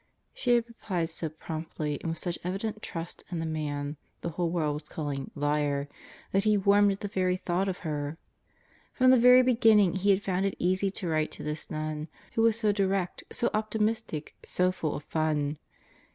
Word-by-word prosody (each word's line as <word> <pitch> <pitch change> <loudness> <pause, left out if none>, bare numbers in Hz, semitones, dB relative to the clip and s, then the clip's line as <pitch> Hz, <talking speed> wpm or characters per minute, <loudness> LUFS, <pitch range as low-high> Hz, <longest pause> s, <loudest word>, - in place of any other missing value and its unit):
She 245 -1 +2
had 235 -1 +2
replied 180 -8 -2
so 160 0 -3
promptly 155 -1 -4
and 165 - -3
with 165 - -3
such 175 -2 -2
evident 205 +4 -3
trust 165 0 -5
in 175 - -3
the 165 - -2
man 145 -2 -3 0.2
the - - -2
whole 170 +1 -1
world 160 -3 0
was 150 +1 -7
calling 145 -4 -4
"liar" 145 -1 0 0.4
that 195 +1 +2
he 215 -1 +4
warmed 200 +1 +5
at 195 - -9
the 205 - -2
very 185 -2 0
thought 185 +1 -1
of 185 -2 -2
her. 150 0 -3 0.8
From 255 -1 +5
the 260 - +6
very 250 +1 +8
beginning 225 -7 +5
he 195 +2 0
had 195 0 +4
found 190 0 +1
it 195 - -3
easy 185 +2 +1
to 190 -1 -4
write 155 -1 +1
to - - -6
this 150 +1 -4
nun, 155 0 -3 0.3
who 225 - +1
was 225 -1 +4
so 215 -2 +3
direct, 195 -2 0
so 240 - 0
optimistic, 215 -6 -1
so 180 0 +1
full 160 -5 -2
of 145 - -6
fun. 155 -2 0
180 Hz, 195 wpm, -29 LUFS, 155-205 Hz, 0.8 s, very